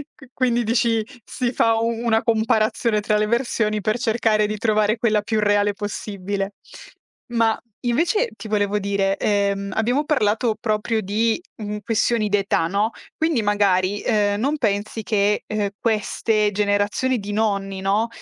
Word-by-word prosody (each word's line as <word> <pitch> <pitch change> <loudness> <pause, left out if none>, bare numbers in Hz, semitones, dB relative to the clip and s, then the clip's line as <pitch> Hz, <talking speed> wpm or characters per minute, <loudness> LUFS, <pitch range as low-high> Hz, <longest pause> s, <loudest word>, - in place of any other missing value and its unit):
Qui 270 -3 -16
quindi 240 -2 +1
dici, 225 -1 +1 0.2
si 250 -2 -2
fa 225 0 +3
u 225 +1 0
una 230 -1 0
comparazione 220 0 +1
tra 210 0 +1
le 210 - +1
versioni 215 -3 0
per 215 +2 0
cercare 220 -3 +2
di 215 0 -3
trovare 215 0 +1
quella 215 -2 +2
più 215 +1 -1
reale 205 0 +2
possibile. 200 -1 -4 0.8
Ma, 225 -1 +2 0.2
invece, 335 - +1
ti - - -8
volevo 205 -1 +1
dire, 195 -1 0
ehm, 200 -1 0
abbiamo 245 +7 +1
parlato 220 -5 +1
proprio 220 0 0
di, 220 - 0 0.2
mhmm, 210 -1 -5
questioni 225 -1 +1
d'età, 195 -5 +1
no? 205 +5 0 0.3
Quindi 320 -6 +1
magari, 205 -1 +1
ehm, 205 -2 +1
non 280 +6 0
pensi 215 -2 -1
che, 210 -1 +1
ehm, 210 -1 -1
queste 215 -1 0
generazioni 205 +5 0
di 205 0 -6
nonni, 200 -3 -1
no, 205 +4 +1
215 Hz, 150 wpm, -22 LUFS, 205-230 Hz, 0.8 s, fa